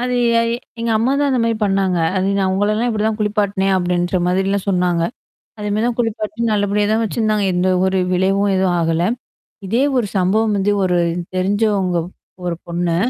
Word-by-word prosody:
அது 250 0 -1 0.3
எ - - +2 0.4
எங்க 230 - -1
அம்மா 245 +4 +1
தான் 285 - +2
அந்த 255 - +1
மாரி 230 -1 0
பண்ணாங்க. 195 -3 +1 0.2
அது 190 +1 +1
நான் 190 -1 +1
உங்களல்லாம் 215 +5 +1
இப்படி 215 -2 -1
தான் 220 0 -1
குளிப்பாட்டனேன் 205 -2 0
அப்படின்ற 175 0 0
மாதிரிலாம் 195 +2 0
சொன்னாங்க. 180 -3 +1 0.6
அதே 210 -1 -4
மாரி 215 +3 0
தான் 245 - -2
குளிப்பாட்ட 225 0 -2
நல்லபடியா 205 0 +1
தான் 225 +1 +2
வச்சிருந்தாங்க. 215 -2 0
எந்த 180 +1 +1 0.2
ஒரு 190 0 +1
விளைவும் 195 +2 +2
எதுவும் 185 -1 +1
ஆகல. 165 +1 +1 0.6
இதே 235 +6 +1 0.2
ஒரு 225 - 0
சம்பவம் 210 +4 +2
வந்து 200 +1 +1
ஒரு 180 -1 +1 0.4
தெரிஞ்சவங்க 195 -1 +1 0.5
ஒரு 175 -1 -2
பொண்ணு. 170 0 -1
200 Hz, 170 wpm, -18 LUFS, 185-215 Hz, 0.6 s, எ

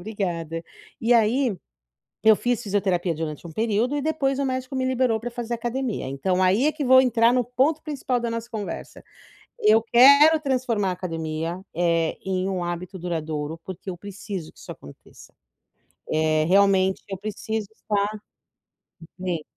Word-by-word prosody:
obrigada. 170 -5 -4 0.4
E 235 +2 +2
aí, 235 +1 +3 0.7
eu 220 0 +8
fiz 245 0 -1
fisioterapia 190 -4 0
durante 155 0 -5
um 165 - -8
período 225 - 0
e - - -1
depois 275 -3 0
o 280 - 0
médico 260 0 -3
me 260 0 0
liberou 255 -3 +1
pra 240 +2 -5
fazer 240 0 -5
academia, 240 - -3
então 180 +8 -1
aí 195 +9 +3
é 305 - +3
que 295 -3 -4
vou 260 +1 +7
entrar 235 -1 +3
no 250 - +2
ponto 265 +6 +1
principal 270 -5 -2
da 235 - -2
nossa 230 +1 -5
conversa, 215 -3 -6 0.6
eu 215 +1 +5
quero 280 +7 +7
transformar 245 -8 0
a - - -1
academia, 165 -1 -4
eh, 165 -1 +1
em 190 0 -1
um 185 -2 -2
hábito 175 +2 -5
duradouro, 160 -2 -4
porque 190 +1 -7
eu 180 - -6
preciso 200 -2 -7
que - - -24
isso - - -11
aconteça, 70 - -15 0.8
eh, 155 0 +2
realmente 190 +1 +3
eu 195 - -4
preciso 215 +1 -4
estar 205 -2 -1 1.1
bem. 180 -4 -3
205 Hz, 160 wpm, -24 LUFS, 175-245 Hz, 1.1 s, eu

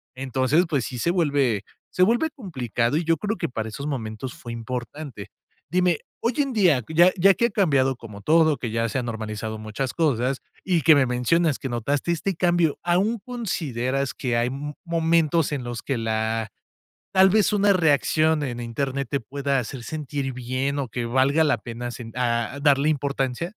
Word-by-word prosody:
Entonces, 135 +6 +1
pues, 140 -8 0
sí 125 - -6
se 170 - +1
vuelve, 140 - +1 0.3
se 185 - +3
vuelve 240 +10 +3
complicado 130 - -2
y 170 - 0
yo 165 -1 +2
creo 210 +7 -2
que - - -2
para 110 -2 -4
esos 140 +7 -6
momentos 120 -2 -4
fue 120 -1 -8
importante. 120 0 -6 0.4
Dime, 180 -2 +2 0.2
hoy 235 +1 0
en 275 -3 +1
día, 175 - +3
ya 170 +3 +5
ya 195 +3 +6
que 235 - +2
ha - - -6
cambiado 140 -10 +2
como 105 -4 -10
todo, 155 +3 +4
que 120 -2 -4
ya 115 +1 0
se 120 - -1
han 125 - -4
normalizado 110 -1 -4
muchas 110 +5 -4
cosas 135 -5 +1 0.2
y 175 -4 +1
que 160 - +8
me 140 - +4
mencionas 145 +5 +1
que 135 - -4
notaste 135 +7 -1
este 175 +2 -1
cambio, 175 -3 +2
¿aún 190 +7 +2
consideras 140 - -2
que 120 -3 -1
hay, 120 +1 +2
m 145 +3 -5
momentos 165 -2 +2
en 135 -4 -2
los 120 -2 -5
que 135 -3 -1
la 110 0 -1 0.6
tal 190 0 +6
vez 215 -3 +3
una 200 0 +4
reacción 155 -1 +2
en 120 -3 -4
Internet 135 +3 -3
te 140 - 0
pueda 140 +3 -2
hacer 125 +1 -6
sentir 145 -2 -4
bien 130 +3 -2
o 135 - -2
que 120 +1 -3
valga 135 +6 +3
la 145 -6 +2
pena 120 +2 -6
sen 115 -2 -8
a 120 +1 -1
darle 140 0 +4
importancia? 140 0 -1
140 Hz, 185 wpm, -24 LUFS, 120-165 Hz, 0.6 s, que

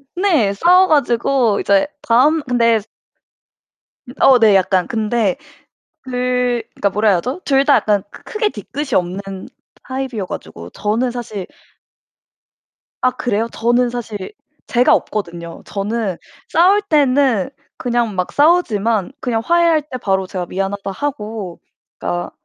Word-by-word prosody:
네 330 - +2
싸워 360 - +5
가지고 240 - +2
이제 200 +3 +2
다음 290 +7 +3
근데 230 -3 +2 1.4
어 260 -2 +7
네 215 -3 +5
약간. 185 -1 +2
근데 220 -3 0 0.7
그 250 -1 -1
그니까 200 - 0
뭐라 210 +2 +1
해야 190 - +4
하죠? 255 - -4
둘 275 -1 +3
다 285 - +5
약간 205 -3 +1
크 - - -14
크게 430 -1 -1
뒤끝이 290 -8 -5
없는 190 +2 -3 0.3
타입이어 260 -6 -4
가지고 85 - -8
저는 230 +4 -1
사실 225 -6 -6 1.6
아 255 - +3
그래요? 230 -3 -1
저는 240 +2 +1
사실 225 -5 -6 0.4
제가 245 +1 +4
없거든요. 170 -5 -3
저는 205 -2 -3 0.3
싸울 375 +5 +4
때는 275 - +2 0.3
그냥 240 -4 -1
막 180 -1 -2
싸우지만 230 - +2
그냥 230 -3 -1
화해할 340 -1 +3
때 255 - -4
바로 190 -1 0
제가 185 -2 -4
'미안하다.' 195 +1 -3
하고 215 -7 -5 0.4
그니까 85 0 -3
230 Hz, 260 characters per minute, -18 LUFS, 200-265 Hz, 1.6 s, 어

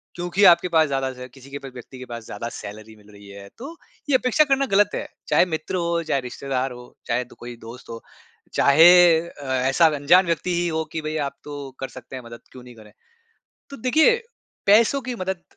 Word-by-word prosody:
क्योंकि 175 +3 -1
आपके 170 +1 +2
पास 160 -1 +5
ज़्यादा 135 -1 -2
जो - - -11
है 125 - -7
किसी 135 +1 -16
के 140 - -5
भी 135 - -7
व्यक्ति 130 +1 -12
के 130 - -8
पास 115 -1 -7
ज़्यादा 110 +3 -6
सैलरी 110 +2 -10
मिल 105 0 -21
रही 100 0 -15
है 100 0 -11
तो 280 +8 -9 0.3
ये 265 - +3
अपेक्षा 255 +4 +3
करना 270 0 +3
ग़लत 205 +1 +4
है। - - -4 0.2
चाहे - - +4
मित्र 155 +4 -5
हो, 170 -1 -1
चाहे 140 -4 -1
रिश्तेदार 130 +1 -4
हो, 125 0 -10 0.2
चाहे 125 +1 -1
तो - - -15
कोई 120 0 -8
दोस्त 125 +2 -12
हो, 115 0 -8 0.5
चाहे 155 +5 +6 0.3
अ, 165 -4 -10
ऐसा 130 +5 +2
अनजान 170 +7 +4
व्यक्ति 170 +1 -1
ही 175 0 0
हो 160 -1 -1
कि 160 - -4
भई 155 +1 -4
आप - - -9
तो 145 -2 -8
कर 135 - -4
सकते 130 +2 -10
हैं 125 - -8
मदद, 115 0 -11
क्यों 125 -1 -13
नहीं 125 -1 -14
करें? 110 -2 -16 0.8
तो 280 - -9
देखिए 315 - +4 0.5
पैसों 230 +7 +4
की 250 0 -5
मदद 185 -3 -4
140 Hz, 220 wpm, -22 LUFS, 125-175 Hz, 0.8 s, चाहे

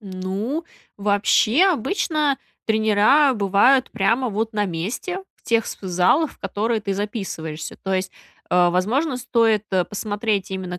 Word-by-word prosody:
Ну, 200 - -4 0.3
вообще, 210 - +3
обычно 300 - 0 0.3
тренера 220 +6 +4
бывают 210 +6 +3
прямо, 230 +5 +1
вот, 220 +2 -2
на 210 -1 0
месте. 200 - -4 0.2
В - - -36
тех 230 -1 +1
вс - - -7
в 195 - -8
залах, 185 - +2
в - - -24
которые 220 +2 -2
ты 200 -1 -2
записываешься. 190 -7 -5
То 190 0 -1
есть, 185 0 -2 0.4
э, 180 -1 +4
возможно, 245 - 0
стоит, 230 -4 +2
э, 185 -2 +2
посмотреть 205 -1 -2
именно 185 -2 -5
210 Hz, 145 wpm, -22 LUFS, 190-245 Hz, 0.4 s, тренера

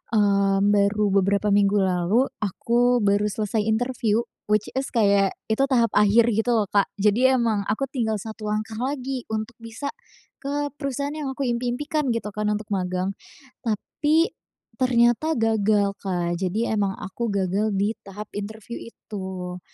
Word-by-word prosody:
eee, 200 -2 +3
baru 205 +1 +3 0.2
beberapa 200 +2 +1
minggu 200 0 +4
lalu 190 +7 +2
aku 240 +4 +2
baru 205 +1 +3
selesai 210 +1 -1
interview, 230 0 +1 0.3
which 210 0 +2
is 270 - -1
kayak 200 -4 +3 0.2
itu 220 +5 +2
tahap 235 -4 +3
akhir 215 +3 +5
gitu, 225 +3 +1
loh, 215 -3 +1
Kak, 200 -1 +3
jadi 235 +6 +4
emang 220 -4 +1
aku 220 +6 0
tinggal 225 -5 0
satu 215 +1 -7
langkah 215 +1 -2
lagi 260 -1 -3
untuk 220 +2 -3
bisa 230 +5 -5 0.5
ke 290 +1 -2
perusahaan 280 0 -3
yang 295 -3 -3
aku 275 - -3
impi-impikan 250 +4 -1
gitu, 230 -2 -3
kan, 210 0 -2
untuk 210 0 -3
magang. 185 0 -1 0.5
Tapi, 300 - +1 0.5
ternyata 250 +4 +3
gagal, 215 -2 +2
Kak, 175 -3 -1
jadi 215 +5 0
emang 195 -1 0
aku 230 +5 -4
gagal 200 +2 0
di 200 +2 +1
tahap 205 +2 -8
interview 215 +3 -6
itu. 190 -4 -7
215 Hz, 145 wpm, -24 LUFS, 200-240 Hz, 0.5 s, akhir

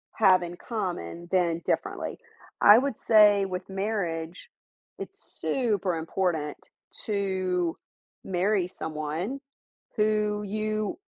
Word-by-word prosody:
have 185 -4 +5
in 175 0 -6
common 175 - -4
than 170 -3 +2
differently. - - -2 0.4
I 205 +2 +9
would 265 -1 0
say 210 -3 +6
with 185 0 -5
marriage, 190 - -3 0.5
it's - - -9
super 205 -9 0
important 160 -2 -1 0.5
to 185 -4 0 0.5
marry 185 0 0
someone 160 - -3 0.6
who 210 -1 +1
you 215 +2 -2
190 Hz, 95 wpm, -27 LUFS, 175-210 Hz, 0.6 s, I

